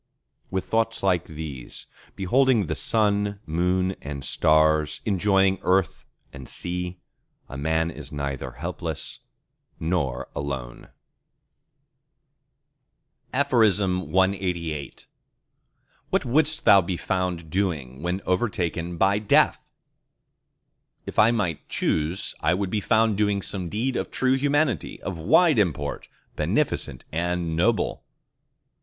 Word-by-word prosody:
With 95 -1 -2
thoughts 115 0 0
like 90 -3 +2
these, 75 -6 -7 0.3
beholding 120 +3 +3
the - - -2
Sun, 105 -2 +1
Moon, 90 +3 0
and 70 -1 -6
Stars, 80 -1 +3
enjoying 95 -1 +2
earth 95 -1 +1 0.3
and 65 -3 -10
sea, 90 0 -4 0.5
a - - -9
man 80 +3 0
is 75 -2 -10
neither 70 -3 -4
helpless 85 +2 -5 0.6
nor 80 -7 -1
alone! 65 -4 -5 2.4
CLXXXIX 95 - +1 1.0
What - - +1
wouldst 155 +5 +1
thou 100 - +8
be 90 0 -3
found 90 -4 -2
doing 75 -9 -2
when 90 +3 -2
overtaken 90 -4 -1
by 100 +3 +3
Death? 105 - +3 1.5
If - - -3
I 105 - +7
might 100 -10 -2
choose, 80 +5 -1
I 90 - +2
would 95 -1 -2
be 105 - 0
found 110 0 +2
doing 100 -2 +1
some 90 -4 -4
deed 120 +6 -1
of - - -2
true 130 0 +1
humanity, 140 - 0
of 90 -3 -4
wide 155 - +4
import, 75 -7 -1 0.3
beneficent - - -1
and 85 0 -1
noble. 110 +7 +1
90 Hz, 110 wpm, -25 LUFS, 80-105 Hz, 2.4 s, thou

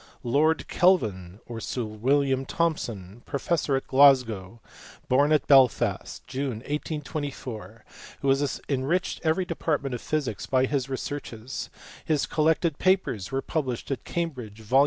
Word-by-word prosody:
Lord 150 +6 +2
Kelvin 105 - +2 0.2
(Sir 125 +2 -3
William 130 +5 +1
Thomson), 120 - -2
professor 145 0 0
at 135 - -2
Glasgow, 125 -7 +4 0.5
born 140 +2 +3
at 155 - +3
Belfast 135 -4 +3
in - - -37
June, 135 +1 -2 0.2
1824, 140 - -5 0.4
who 140 - +1
has 135 +1 +1
enriched 145 +7 -1
every 165 +3 +1
depart 155 -3 -1
ment 135 -2 -3
of 120 - -4
physics 145 -9 -2
by 130 0 +3
his 135 -1 -1
researches: 130 -3 -5 0.3
his 155 -3 +1
collected 160 0 +1
papers 185 - +1
were 135 0 -1
published 135 -5 -3
at 135 - -3
Cambridge, 125 -11 -4
vol. 125 +5 +3
135 Hz, 135 wpm, -26 LUFS, 120-150 Hz, 0.5 s, Glasgow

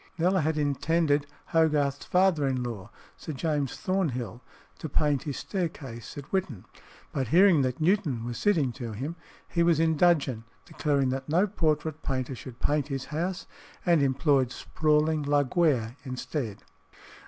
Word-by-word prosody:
Kneller 180 +2 +2
had 155 +1 0
intended 145 0 +1 0.2
Hogarth's 150 -4 +2
father 180 -6 +3
in 130 -2 -1
law, 115 -4 -6 0.3
Sir 155 - -6
James 145 -2 -1
Thornhill, 130 - -2 0.4
to 155 - -5
paint 145 -1 +1
his 145 -3 -4
staircase 145 - -5
at 140 - -6
Whitton, 170 - -2 0.5
but 135 -3 -2
hearing 175 - +6
that 130 -1 -1
Newton 155 - +1
was 120 -1 -4
sitting 165 -11 +2
to 120 -2 -6
him, 140 +10 -4 0.3
he 170 - 0
was 170 -2 +4
in 160 -1 +3
dudgeon, 145 -9 +2 0.2
declared 140 -4 0
that 135 +2 -4
no 175 +6 +4
portrait 155 -5 -1
painter 130 -1 -2
should 125 -1 -10
paint 145 -1 +1
his 135 -2 -4
house, 175 +4 -2 0.4
and 170 -4 +4
employed 135 -1 +2
"sprawling" 155 +3 +1
Laguerre 145 -4 +1
instead. 130 -4 -4
145 Hz, 145 wpm, -28 LUFS, 130-165 Hz, 0.5 s, hearing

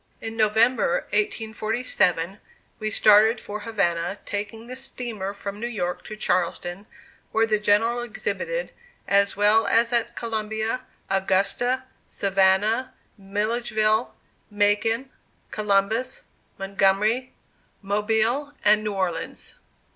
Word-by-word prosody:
In 225 0 -6
November, 220 -3 +3
1847, 210 -4 0 0.4
we 215 - -2
started 215 +2 +5
for 210 +1 -6
Havana, 195 -4 -1
taking 210 +2 -5
the 250 +1 -7
steamer 240 -7 -5
from 200 0 -7
New 235 - -2
York 180 -6 -3
to 215 - -7
Charleston, 180 0 -1 0.4
where 225 +1 +3
the 215 -1 +1
General 215 +3 +2
exhibited, 485 - -3 0.4
as 200 0 +3
well 210 +2 +4
as 235 +1 +3
at 235 -1 0
Columbia, 220 +1 -2 0.3
Augusta, 195 +7 +1 0.2
Savannah, 200 +6 +1 0.2
Milledgeville, 215 +2 0 0.3
Macon, 210 +5 +1 0.4
Columbus, 215 +5 0 0.3
Montgomery, 200 +5 +1 0.5
Mobile 220 +8 0
and 210 +1 +5
New 210 -1 -2
Orleans. 185 -4 -3
215 Hz, 100 wpm, -24 LUFS, 200-230 Hz, 0.5 s, started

